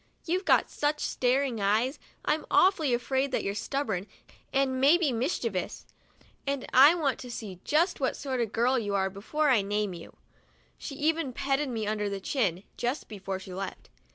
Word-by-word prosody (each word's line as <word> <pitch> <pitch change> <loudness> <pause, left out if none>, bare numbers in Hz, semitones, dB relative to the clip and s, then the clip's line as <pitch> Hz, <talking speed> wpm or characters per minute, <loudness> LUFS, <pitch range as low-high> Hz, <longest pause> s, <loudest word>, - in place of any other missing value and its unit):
You've 365 +3 -1
got - - +3
such 295 0 -1
staring 255 -2 0
eyes, 220 +7 +1 0.3
I'm 310 - 0
awfully 345 -7 +4
afraid 265 +3 0
you're 200 - -1
stubborn 210 -4 -2 0.4
and 265 -1 +1
maybe 300 +2 +5
mischievous, 230 - -2 0.6
and 275 -2 -1
I 280 +6 +8
want 290 -6 0
to 250 - -8
see 205 -6 -7
just 335 +4 +2
what 260 -2 0
sort 260 -3 -2
of 230 - +1
a - - -19
girl 245 +3 +2
you 205 -3 -2
are 190 -1 +1
before 290 +10 0
I 235 -5 +4
name 205 0 -1
you." 170 -1 -11 0.6
She 280 - -6
even 310 -2 0
petted 275 +2 0
me 225 -3 -2
under 210 -1 -1
the 200 -1 -4
chin, 195 - -1
just 245 +4 -2
before 195 -2 -4
she 190 -1 -10
left. 190 0 -6
255 Hz, 175 wpm, -28 LUFS, 205-280 Hz, 0.6 s, I